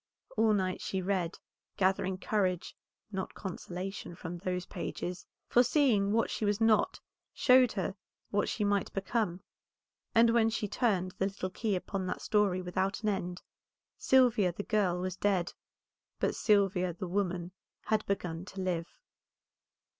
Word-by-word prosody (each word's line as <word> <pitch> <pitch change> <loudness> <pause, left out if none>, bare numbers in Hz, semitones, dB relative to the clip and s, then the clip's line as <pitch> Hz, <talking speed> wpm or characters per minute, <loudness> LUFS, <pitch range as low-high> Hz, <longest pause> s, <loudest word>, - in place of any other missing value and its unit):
All 220 0 +4
night 185 -2 0
she 190 - -2
read, 185 -2 -1 0.4
gathering 190 0 +1
courage, 185 -3 -1 0.4
not 190 -2 -4
consolation, 185 -1 -6
from 170 +1 -6
those 180 0 -2
pages, 180 0 -5 0.2
for 245 - +5
seeing 235 -7 +3
what 225 +1 +2
she - - -3
was 205 0 +1
not 225 - +3 0.4
showed 255 -2 +5
her 190 -2 -2 0.4
what 205 0 +1
she 210 - -1
might 205 -1 +1
become; 195 -2 -1 0.7
and 230 0 +6
when 230 -1 +4
she 220 -1 -2
turned 195 -5 +1
the 195 - +2
little 190 -1 -4
key 210 0 -1
upon 190 +1 -3
that - - -4
story 200 -4 +2
without 190 +4 -1
an 215 - +2
end, 180 -3 -3 0.5
Sylvia 240 -8 +4
the 190 +4 -5
girl 195 -5 +1
was 185 0 -3
dead, 190 -3 0 0.7
but - - +1
Sylvia 195 -4 +2
the 180 +2 -5
woman 180 -2 -1 0.3
had 215 -1 +1
begun 180 -4 -2
to 195 - -9
live. 175 -3 -1
195 Hz, 145 wpm, -31 LUFS, 180-215 Hz, 0.7 s, and